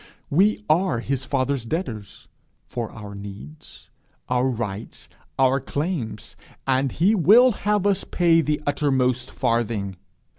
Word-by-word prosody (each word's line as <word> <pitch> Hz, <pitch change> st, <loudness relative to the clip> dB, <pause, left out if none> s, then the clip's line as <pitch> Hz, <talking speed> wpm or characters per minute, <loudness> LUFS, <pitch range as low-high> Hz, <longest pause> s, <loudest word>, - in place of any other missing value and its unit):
We 205 Hz, +7 st, +2 dB
are 170 Hz, -4 st, +2 dB
his 130 Hz, +2 st, -2 dB
father's 135 Hz, -1 st, -1 dB
debtors 115 Hz, -, -5 dB, 0.4 s
for 115 Hz, -3 st, -5 dB
our 105 Hz, -2 st, -9 dB
needs, 100 Hz, +10 st, -11 dB, 0.4 s
our 125 Hz, +1 st, +2 dB
rights, 115 Hz, -4 st, -5 dB, 0.3 s
our 135 Hz, 0 st, +3 dB
claims, 140 Hz, -, -4 dB, 0.3 s
and 135 Hz, 0 st, +1 dB
he 185 Hz, +7 st, +2 dB
will 225 Hz, -, +6 dB
have 210 Hz, -2 st, 0 dB
us 200 Hz, -2 st, +2 dB
pay 170 Hz, -2 st, +3 dB
the 150 Hz, -1 st, -1 dB
uttermost 130 Hz, -3 st, +1 dB
farthing. 110 Hz, -5 st, -1 dB
135 Hz, 120 wpm, -23 LUFS, 115-170 Hz, 0.4 s, will